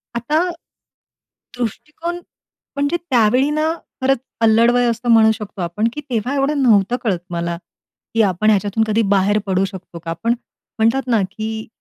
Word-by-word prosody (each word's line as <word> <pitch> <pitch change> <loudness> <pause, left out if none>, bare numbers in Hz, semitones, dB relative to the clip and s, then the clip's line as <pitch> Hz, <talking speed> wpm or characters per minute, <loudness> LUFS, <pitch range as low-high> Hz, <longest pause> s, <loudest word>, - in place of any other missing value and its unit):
आता, 240 +7 0 1.2
दृष्टिकोन 300 - -4 0.6
म्हणजे 285 +4 0
त्यावेळी 250 +2 +3
ना 310 +1 +1 0.3
खरंच 270 +1 +3 0.2
अल्लड 225 +1 +5
वय 245 0 +2
असतो, 235 +1 -2
म्हणू 220 -1 +6
शकतो 210 -2 -7
आपण, 175 +6 0
की 295 - -5
तेव्हा 245 +3 -1
एवढं 280 +1 +1
नव्हतं 215 -2 +4
कळत 195 -7 0
मला, 170 0 -3 0.6
की 225 - +3
आपण 190 +4 +1
ह्याच्यातून 205 +1 +2
कधी 220 +1 +2
बाहेर 200 +2 +3
पडू 190 -1 +1
शकतो 190 -3 -9
का? 165 - -2
पण 230 +1 +3 0.5
म्हणतात 230 +5 +2
ना, 230 -4 +3
की 220 +1 -5
225 Hz, 150 wpm, -19 LUFS, 205-255 Hz, 1.2 s, म्हणू